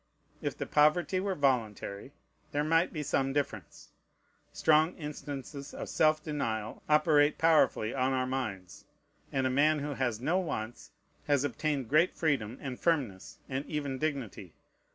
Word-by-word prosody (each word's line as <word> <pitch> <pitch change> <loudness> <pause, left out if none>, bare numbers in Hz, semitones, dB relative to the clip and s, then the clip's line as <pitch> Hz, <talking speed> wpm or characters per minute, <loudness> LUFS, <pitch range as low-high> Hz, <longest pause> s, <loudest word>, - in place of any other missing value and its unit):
If - - -3
the - - -3
poverty 155 +5 +3
were 190 0 -1
voluntary, 120 - -1 0.4
there 145 +1 +1
might 165 +3 +2
be 155 -3 -4
some 135 -1 0
difference. 110 - -4 0.6
Strong 155 +3 +3
instances 145 -2 -7
of - - -6
self 155 0 +3
denial 110 -8 -3
operate 150 -1 +4
powerfully 155 -8 +3
on 130 0 +1
our 130 -1 +1
minds; 110 -9 -5 0.5
and 135 -1 0
a 130 - +1
man 150 +4 +3
who 145 0 -3
has 120 -5 -1
no 165 +9 +1
wants 120 -10 -5 0.4
has 145 -2 +3
obtained 145 0 -1
great 155 +8 +3
freedom 130 -7 0
and 130 -3 -5
firmness, 135 - -1
and 135 +1 -3
even 145 -4 -3
dignity. 130 - -4
140 Hz, 145 wpm, -30 LUFS, 125-155 Hz, 0.6 s, operate